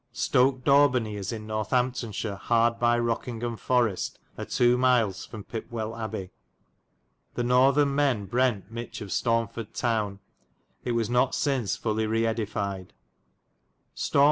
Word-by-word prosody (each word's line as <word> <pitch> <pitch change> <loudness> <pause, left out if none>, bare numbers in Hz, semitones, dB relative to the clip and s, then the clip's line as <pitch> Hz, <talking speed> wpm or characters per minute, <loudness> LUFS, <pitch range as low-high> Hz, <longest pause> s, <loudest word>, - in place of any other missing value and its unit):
Stoke 130 -1 +2
Dawbeney 130 -6 +4
is 100 -2 -4
in 110 -2 -6
Northamptonshire 110 -1 -1
hard 115 +3 +1
by 120 0 +3
Rokyng 120 0 -2
ham 120 -1 -2
Forest 120 -4 0 0.2
a - - -5
2. 120 0 +3
miles 125 -6 +2
from 110 -3 -8
Pipwell 110 0 -5
Abbay. 110 -5 -5 1.0
The 120 - -1
northen 135 +3 +4
men 135 -8 +1
brent 120 0 0
miche 115 0 -6
of 105 - -6
Staunford 115 -1 -1
towne. 110 -4 0 0.6
It - - -10
Lincoln 120 - 0
was 115 -1 0
not 125 +2 +2
synce 135 -8 0
fully 110 -1 -1
reedified. 105 -4 -1 1.1
shire. - - 0
115 Hz, 135 wpm, -27 LUFS, 110-125 Hz, 1.1 s, Dawbeney